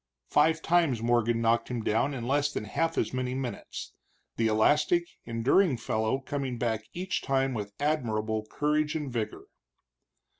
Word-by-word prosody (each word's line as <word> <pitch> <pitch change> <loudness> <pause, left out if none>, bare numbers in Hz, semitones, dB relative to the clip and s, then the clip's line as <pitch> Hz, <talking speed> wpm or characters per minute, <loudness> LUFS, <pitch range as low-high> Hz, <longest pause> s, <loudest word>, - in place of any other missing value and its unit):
Five 160 +2 +3
times 160 -9 +2
Morgan 120 -1 +2
knocked 115 0 +2
him 120 -3 -3
down 115 +7 +1
in 120 -2 -4
less 145 +2 +2
than - - -3
half 165 +9 -1
as - - 0
many 130 0 -2
minutes, 130 -2 -5 0.4
the 115 - +1
elastic, 150 +10 +3 0.2
enduring 125 +7 +2
fellow 110 +2 0
coming 135 -2 -3
back 110 -2 -1
each 180 +1 -2
time 135 -1 +1
with 105 -3 -4
admirable 110 -7 -1
courage 150 +1 0
and 145 -5 -3
vigor. 110 -3 -3
130 Hz, 150 wpm, -29 LUFS, 115-150 Hz, 0.4 s, Five